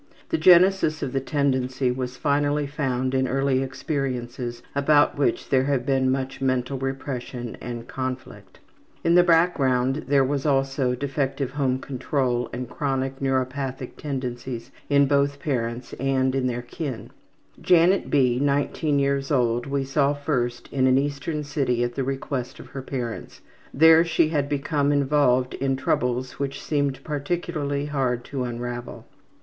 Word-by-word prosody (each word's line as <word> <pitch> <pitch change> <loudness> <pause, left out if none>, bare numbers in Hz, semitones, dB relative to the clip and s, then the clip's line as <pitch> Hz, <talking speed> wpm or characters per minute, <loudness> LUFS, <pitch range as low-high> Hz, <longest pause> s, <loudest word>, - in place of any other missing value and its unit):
The 325 - +1
genesis 180 -3 +5
of 135 -2 -3
the 135 - +1
tendency 130 -2 0
was 125 0 -4
finally 145 0 +1
found 130 -3 -2
in 130 0 +2
early 135 0 +1
experiences 125 -3 -4
about 145 +1 +3
which 140 -5 0
there 130 -1 +3
have 135 -3 0
been 135 -2 +2
much 135 0 -2
mental 130 0 0
repression 130 -3 -4
and 120 -1 -6
conflict. 130 -7 -6 0.5
In 170 - +3
the 180 - +7
background 145 -6 +2
there 140 -1 +4
was 135 +1 -1
also 135 -3 +1
defective 135 0 -2
home 135 -2 0
control 130 -2 -1
and 125 +1 -5
chronic 135 0 -2
neuropathic 130 -1 -2
tendencies 125 -4 -5 0.2
in 140 0 +5
both 140 0 +1
parents 120 -3 -3
and 130 0 0
in 135 -1 0
their 120 -1 -3
kin. 130 -1 -6 0.5
Janet 180 +2 +4
B., 125 -4 +3
19 145 +1 +1
years 140 0 0
old, 120 -4 +1
we 140 0 -1
saw 140 +1 +1
first 125 -5 -2
in 130 -1 +3
an 130 0 +4
eastern 145 +2 -2
city 135 -4 0
at 120 0 -2
the 135 - -2
request 135 -1 -4
of - - -11
her 135 - -6
parents. 125 -4 -5 0.3
There 160 +3 +7
she 160 -2 +2
had 145 -3 0
become 145 0 0
involved 140 -3 +2
in 135 0 0
troubles 125 -1 -1
which 140 -1 -3
seemed 140 -3 -1
particularly 145 -1 -2
hard 130 -4 -1
to 130 -3 -3
unravel. 120 0 -6
135 Hz, 145 wpm, -24 LUFS, 125-145 Hz, 0.5 s, the